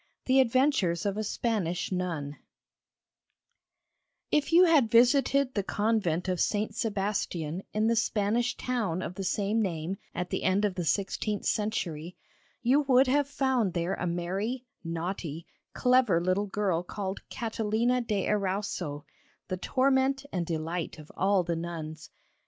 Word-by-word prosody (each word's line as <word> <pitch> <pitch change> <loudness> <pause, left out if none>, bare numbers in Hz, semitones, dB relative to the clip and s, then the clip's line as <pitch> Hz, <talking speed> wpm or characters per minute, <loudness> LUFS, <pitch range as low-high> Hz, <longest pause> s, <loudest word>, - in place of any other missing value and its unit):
THE 265 +1 +4
ADVENTURES 255 - +2
OF 200 -1 0
A 215 - -1
SPANISH 200 -6 -1
NUN 165 -6 -3 1.9
If 300 +1 +1
you 345 +2 +7
had 300 -9 +4
visited 260 +3 +4
the 205 - 0
convent 200 -4 0
of 180 -2 -1
St. 215 +1 0
Sebastian 195 -6 -2
in 215 +1 0
the 230 +1 +3
Spanish 225 +2 +1
town 210 -9 -1
of - - -5
the 195 - -5
same 205 +4 0
name 175 -1 -2 0.2
at 180 0 -3
the - - -1
end 195 +3 +2
of 200 - 0
the 180 -2 -3
sixteenth 200 +3 -1
century, 180 -6 -2 0.5
you 260 +5 +4
would 265 -2 +5
have 280 +2 +2
found 265 -8 0
there 170 +2 0
a 180 - -2
merry, 195 +9 -2 0.2
naughty, 165 -1 -4 0.3
clever 250 -8 +3
little 185 +4 0
girl 195 -4 0
called 190 +2 -5
Catalina 230 +1 0
de 210 -5 -1
Erauso, 190 -7 -2 0.5
the 185 - -2
torment 270 +5 +1
and 175 -3 -1
delight 165 +1 -3
of 155 -1 -12
all 195 -1 +2
the 170 -1 -1
nuns. 160 -2 -6
200 Hz, 140 wpm, -29 LUFS, 175-235 Hz, 1.9 s, you